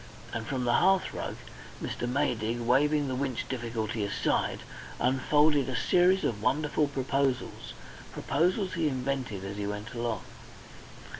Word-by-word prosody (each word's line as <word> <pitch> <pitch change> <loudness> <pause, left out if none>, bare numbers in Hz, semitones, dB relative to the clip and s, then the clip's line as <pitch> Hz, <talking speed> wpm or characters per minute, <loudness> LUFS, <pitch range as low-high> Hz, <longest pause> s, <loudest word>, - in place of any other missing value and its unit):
And 110 0 -3
from 130 -1 -1
the 120 - +3
hearthrug 190 +7 +2 0.4
Mr. 120 - -3
Maydig, 120 -4 0
waving 145 +5 +3
the 130 - -2
Winch 130 -2 -2
difficulty 115 -3 -2
aside, 100 - 0 0.4
unfolded 140 +2 +3
a 130 - -2
series 180 +8 +4
of 105 -3 -1
wonderful 150 +4 +1
proposals 135 -1 -1 0.4
proposals 185 +6 0
he 165 -3 +1
invented 130 -7 -2
as 100 +1 -5
he 100 -1 -2
went 105 +4 -5
along. 115 -4 -2
130 Hz, 130 wpm, -29 LUFS, 115-145 Hz, 0.4 s, series